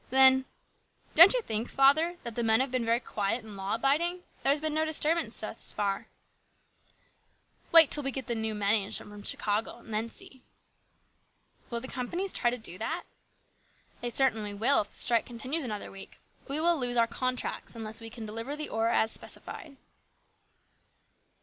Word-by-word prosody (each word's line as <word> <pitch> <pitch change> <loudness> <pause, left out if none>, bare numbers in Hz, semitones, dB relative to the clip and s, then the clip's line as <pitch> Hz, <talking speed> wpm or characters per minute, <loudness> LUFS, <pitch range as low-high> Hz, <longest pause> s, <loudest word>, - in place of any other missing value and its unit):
Then: 265 0 +6 0.4
" - - -36
Don't 350 +9 +10
you - - 0
think, 220 - -2
father, 310 +6 +3
that 235 -2 -5
the 235 - -2
men 225 0 +4
have 265 0 0
been 255 -2 0
very 230 +1 +1
quiet 220 0 -3
and 215 -2 -11
law 195 +2 -3
abiding? 335 +9 0 0.2
There - - +1
has 290 - +2
been 310 0 -2
no 310 +1 +1
disturbance 315 +1 +1
thus - - -1
far." 200 -1 -2 1.6
"Wait 330 -3 +7
till 295 - +2
we 270 - -2
get 265 -2 -5
the 240 - -2
new 220 -1 -3
men 205 0 +1
in 200 -3 +1
from 205 0 -4
Chicago 210 +2 -2
and 230 -2 -12
then 220 +2 -1
see." 260 +2 -8 0.6
" - - -39
Will 235 -1 -3
the 260 - -6
companies 345 +11 -3
try 240 - +2
to 245 - -3
do 185 -6 -5
that? 325 +10 -3 0.5
" - - -35
"They 240 - -2
certainly 225 -5 0
will 235 +7 +3
if 205 - -9
the - - -13
strike 235 -1 +2
continues 255 +7 -3
another 215 -5 -5
week. 195 0 -12 0.3
We 285 +2 -3
lose 295 -8 0
our 230 - +5
contracts 255 +1 -4
unless 220 0 -7
we 225 - -7
can 225 0 -9
deliver 230 +6 -5
the 300 0 -5
ore 225 +1 0
as 220 -1 +2
specified." 290 -5 -5
240 Hz, 185 wpm, -29 LUFS, 220-280 Hz, 1.6 s, Don't